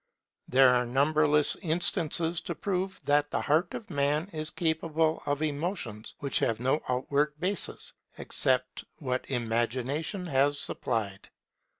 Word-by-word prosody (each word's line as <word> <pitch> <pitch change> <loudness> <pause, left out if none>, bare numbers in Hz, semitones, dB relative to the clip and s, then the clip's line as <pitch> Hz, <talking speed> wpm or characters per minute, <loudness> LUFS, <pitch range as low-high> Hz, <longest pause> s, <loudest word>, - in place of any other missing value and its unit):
There 130 0 +6
are 125 0 +3
numberless 150 +3 +3
instances 170 -1 +1
to - - -5
prove 190 -1 -2
that 145 0 +3
the - - -1
heart 160 +4 +1
of 210 -4 -8
Man 145 +3 +1
is 155 -1 -3
capable 160 -1 0
of 145 +1 0
emotions 145 - -3
which 140 -2 -1
have 115 -1 0
no 130 +5 +1
outward 145 +4 0
basis, 185 +2 -1 0.2
except - - -1
what 125 0 -3
Imagination 130 - -1
has 145 -2 +2
supplied. 105 -5 -2
150 Hz, 125 wpm, -29 LUFS, 130-160 Hz, 0.2 s, There